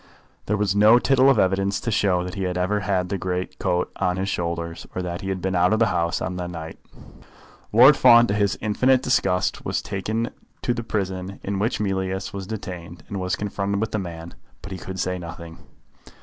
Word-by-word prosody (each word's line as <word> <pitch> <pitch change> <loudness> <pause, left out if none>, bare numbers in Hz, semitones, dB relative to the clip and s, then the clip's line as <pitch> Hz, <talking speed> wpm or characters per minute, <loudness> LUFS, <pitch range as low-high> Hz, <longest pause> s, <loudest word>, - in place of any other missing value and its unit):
There 105 - +1
was 100 -1 0
no 105 +3 +7
tittle 130 +1 +4
of 135 - +4
evidence 95 0 +1
to 115 - -2
show 95 -4 +2
that 90 0 -6
he 100 - -5
had 90 -1 -2
ever 95 +3 +1
had 95 -3 -1
the 100 -1 -2
great 90 0 -3
coat 90 0 0
on 90 0 0
his 95 +1 -2
shoulders, 85 -2 -3
or 95 - -2
that 85 0 -4
he 95 - -4
had 95 -2 -3
been 95 0 0
out 90 +3 +3
of - - +3
the 115 - +4
house 85 0 0
on 90 0 -3
that 90 -1 -4
night. 80 -2 -8 0.9
Lord 125 +6 +8
Fawn, 120 -2 +7
to 100 - -1
his 100 -1 +1
infinite 125 +5 +2
disgust, 90 -7 +1
was - - -1
taken 110 +4 -3 0.3
to 120 - +1
the 120 - -3
prison 95 -3 -3
in 100 0 -2
which 110 +5 0
Mealyus 95 -1 -2
was 95 -1 -6
detained, 90 -6 -7
and 100 - -4
was 90 0 -1
confronted 100 -1 -2
with 110 +1 -2
the 110 - -1
man, 85 -2 -7 0.3
but 100 - -8
he 95 - -5
could 95 0 -7
say 90 0 -1
nothing. 85 -1 -9
95 Hz, 215 wpm, -23 LUFS, 90-105 Hz, 0.9 s, Lord